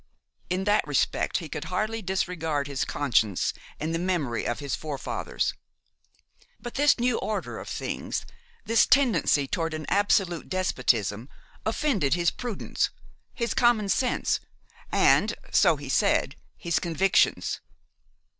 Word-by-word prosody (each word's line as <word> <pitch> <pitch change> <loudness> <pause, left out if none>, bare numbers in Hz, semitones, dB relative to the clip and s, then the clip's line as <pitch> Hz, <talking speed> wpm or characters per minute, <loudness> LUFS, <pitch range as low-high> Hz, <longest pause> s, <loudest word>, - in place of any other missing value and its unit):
In 185 +1 0
that 205 +1 +2
respect - - +1
he - - -5
could - - -5
hardly 220 +1 -2
disregard 175 -6 -1
his 140 -1 -2
conscience 110 -9 +1 0.3
and 155 +2 -2
the 165 - 0
memory 170 -10 -1
of 120 - -1
his 140 -4 -4
forefathers. 150 -3 -3 1.1
But 240 - -7
this 290 +1 +4
new 245 -1 +1
order 215 - -3
of - - -8
things, - - -3 0.4
this 225 +1 +4
tendency 240 - +3
toward 165 +1 -2
an 155 - -5
absolute 195 -4 +1
despotism, 125 - 0 0.4
offended 220 - +1
his 170 -1 +2
prudence, 240 -5 -2 0.5
his 235 -1 -1
common 230 -4 +3
sense, 250 +6 +1 0.5
and, - - +4 0.2
so - - +5
he - - -9
said, - - +2 0.2
his 170 -4 0
convictions. 180 +3 +1
180 Hz, 125 wpm, -26 LUFS, 145-215 Hz, 1.1 s, so